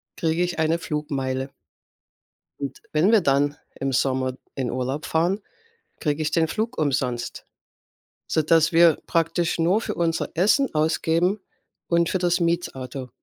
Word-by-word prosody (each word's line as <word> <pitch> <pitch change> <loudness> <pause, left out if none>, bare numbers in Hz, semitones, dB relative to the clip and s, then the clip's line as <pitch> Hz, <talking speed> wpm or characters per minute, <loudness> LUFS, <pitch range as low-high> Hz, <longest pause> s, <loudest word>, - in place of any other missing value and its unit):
kriege 165 +1 0
ich 175 -1 -1
eine 160 +1 +1
Flugmeile. 135 -4 -3 1.1
Und 135 -1 -5
wenn 160 +7 +3
wir 220 -4 +5
dann 145 0 +2 0.2
im 135 0 -2
Sommer 130 0 0 0.2
in 130 -3 -2
Urlaub 130 +4 -3
fahren, 175 +6 +1 0.6
kriege 150 0 -1
ich 155 - 0
den 165 0 +2
Flug 225 +8 -3
umsonst, 135 -5 -2 0.8
sodass 160 +1 +3
wir 165 -1 +6
praktisch 165 +1 0
nur 185 +7 +3
für - - -4
unser 165 -1 0
Essen 215 - +3
ausgeben 165 +5 +1 0.5
und 170 0 +2
für 190 - +1
das 175 0 +1
Mietauto. 135 -7 -2
160 Hz, 135 wpm, -24 LUFS, 135-170 Hz, 1.1 s, wir